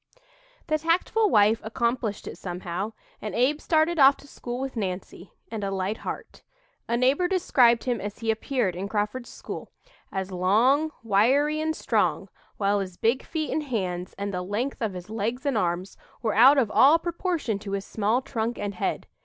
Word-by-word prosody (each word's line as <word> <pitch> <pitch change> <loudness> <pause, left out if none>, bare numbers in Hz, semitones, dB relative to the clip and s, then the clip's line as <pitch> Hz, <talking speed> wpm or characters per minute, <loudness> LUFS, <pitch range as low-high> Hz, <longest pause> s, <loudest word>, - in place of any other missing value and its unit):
The 310 -1 0
tactful 360 +7 +2
wife 210 - +4
accomplished 235 -1 -2
it - - -6
somehow 180 +3 -4 0.3
and 215 - -5
Abe 275 +6 +2
started 320 +1 +2
off 275 0 +7
to 285 - -16
school 245 -2 -6
with 265 0 -4
Nancy, 185 -3 -5 0.2
and 220 -3 -4
a 195 - -1
light 195 +2 -2
heart. - - -7 0.5
A 235 - +1
neighbor 270 +8 +3
described 250 -11 +3
him 245 -2 -1
as 205 0 -5
he 225 -1 0
appeared 220 -4 -1
in 190 +3 -4
Crawford's 210 +4 -2
school, - - -8 0.4
as 190 0 -3
"long, 225 - +3
wiry 265 +9 +3
and 315 0 -1
strong, - - 0 0.3
while 200 0 +2
his 185 -2 -5
big 235 +4 +1
feet 315 -2 -3
and 315 - 0
hands, 185 -10 -3
and 200 0 -3
the 180 - -2
length 215 +10 -3
of 220 -4 -1
his 180 +3 -8
legs 230 +5 -2
and 280 -3 +1
arms, 180 -1 -1 0.3
were 220 - +1
out 265 +6 +7
of 235 -6 +2
all 290 +5 +6
proportion 335 - -2
to 200 -1 -6
his 200 0 -2
small 220 +4 0
trunk 230 -1 -2
and 205 0 -3
head. 180 - -2
225 Hz, 180 wpm, -26 LUFS, 200-275 Hz, 0.5 s, off